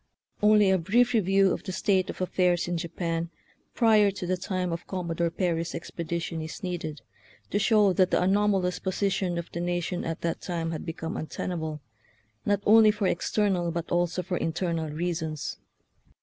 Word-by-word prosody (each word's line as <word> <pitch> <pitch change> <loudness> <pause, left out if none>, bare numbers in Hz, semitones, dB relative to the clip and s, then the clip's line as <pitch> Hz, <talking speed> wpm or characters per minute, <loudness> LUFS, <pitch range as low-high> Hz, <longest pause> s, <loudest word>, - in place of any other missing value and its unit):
Only 210 -2 +5
a 190 - +3
brief 240 +9 +3
review 195 -3 +3
of - - -2
the 185 - -5
state 190 0 +1
of - - -6
af 185 - -1
fairs 180 -2 +2
in 175 - -1
Japan 170 0 -3 0.5
prior 215 -4 +5
to 195 -2 -5
the 185 +1 +1
time 180 -1 -2
of 165 - -6
Com 185 -2 -4
modore 170 0 0
Perry's 170 -1 -1
expedition 170 0 -4
is 155 0 -7
needed 165 -5 -4 0.5
to 205 - +1
show 210 -2 +4
that 185 0 +3
the - - +2
anomalous 190 -1 +2
position 190 -2 -1
of 170 - -5
the 170 - -4
nation 175 0 -2
at 165 0 -4
that 165 -1 -2
time 165 -2 -3
had 160 - -5
become 165 0 -4
untenable, 160 -1 -4 0.7
not 205 -1 +1
only 220 0 +7
for 210 -1 0
external 185 -1 +1
but 170 0 -4
also 175 +1 +1
for 180 0 -2
internal 165 -1 -1
reasons. 160 -1 -3
180 Hz, 175 wpm, -27 LUFS, 165-195 Hz, 0.7 s, only